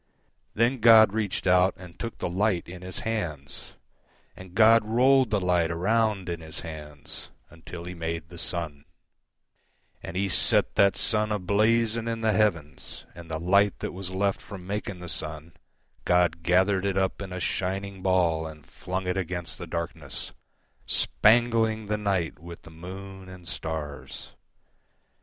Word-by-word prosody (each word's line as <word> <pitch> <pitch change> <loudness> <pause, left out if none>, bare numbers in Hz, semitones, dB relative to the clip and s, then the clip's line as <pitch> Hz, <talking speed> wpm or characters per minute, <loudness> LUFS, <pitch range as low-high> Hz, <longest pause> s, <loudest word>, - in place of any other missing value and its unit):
Then 120 +4 +2
God 110 -2 +8
reached 105 -3 -1
out 90 0 +4
and 90 -1 -13
took 115 -1 -5
the - - -2
light 95 0 0
in 90 +1 -9
His 90 0 -6
hands, 85 -11 -4 0.6
And 95 -1 -12
God 115 +1 +7
rolled 125 +3 +4
the 105 -2 +1
light 90 -3 +2
around 100 +3 +1
in 85 -1 -4
His 80 +1 -8
handsUntil 80 +2 -9
He 90 - -5
made 80 -1 -4
the 85 -1 -10
sun; 80 -4 -4 1.2
And 90 - -6
He 100 +1 +1
set 95 - +3
that 100 -1 +4
sun 105 -1 +1
a 105 - +1
blazing 110 +4 +2
in 115 -1 -2
the 110 -1 +3
heavens. 85 -9 -1
And 85 -1 -11
the 80 -1 -3
light 100 +4 +3
that - - -4
was 95 0 -6
left 95 +1 0
from 95 -3 -9
making 100 -2 -4
the - - -7 1.0
sunGod 90 -1 +3
gathered 95 +3 +3
it 95 -1 -1
up 95 +1 0
in 95 -2 -6
a 90 - -4
shining 95 +2 -2
ballAnd 80 -5 0
flung 95 +1 -5
it 90 +1 -1
against 90 -2 -3
the 85 - -6
darkness, 80 -4 -5 0.5
Spangling 110 -1 +3
the 105 +1 -1
night 95 -7 -1
with 85 +1 -11
the 80 - -13
moon 95 +3 -9
and 90 -2 -11
stars. 80 -5 -5
95 Hz, 150 wpm, -27 LUFS, 85-105 Hz, 1.2 s, God